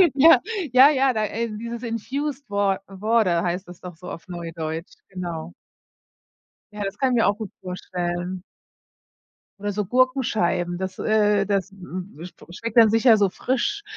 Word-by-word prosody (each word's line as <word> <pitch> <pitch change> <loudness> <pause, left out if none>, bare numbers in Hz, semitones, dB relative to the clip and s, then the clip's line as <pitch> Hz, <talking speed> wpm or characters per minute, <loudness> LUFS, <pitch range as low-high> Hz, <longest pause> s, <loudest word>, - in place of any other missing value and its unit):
Ja. 320 +4 +7 0.3
Ja, 260 +3 +9
ja 270 -3 +2
da, 215 -2 0
äh 230 +3 -3
dieses 235 +1 -6
infused 265 +5 -3
wa 200 -1 +1
water 195 -3 +1
heißt 180 +1 -2
das 180 -1 -12
doch 180 -2 -9
so 180 +2 -10
auf 165 - -9
Neudeutsch, 165 -2 -5 0.2
genau. 175 -3 -6 1.2
Ja, 210 0 -5
das 195 +1 -4
kann 265 +2 +1
ich - - +2
mir 230 - +3
auch 200 0 +1
gut 220 -3 -6
vorstellen. 180 0 -4 1.2
Oder 205 +1 -2
so 205 0 -2
Gurkenscheiben, 220 -8 +1
das, 185 0 -5
äh 210 -2 +2
das, 195 -1 0
m 185 -1 -8
sp 175 +1 -11
schmeckt 230 +4 -5
dann 225 -2 +7
sicher 225 0 +5
so 200 -2 +3
frisch. 335 - -2
205 Hz, 160 wpm, -23 LUFS, 180-230 Hz, 1.2 s, Ja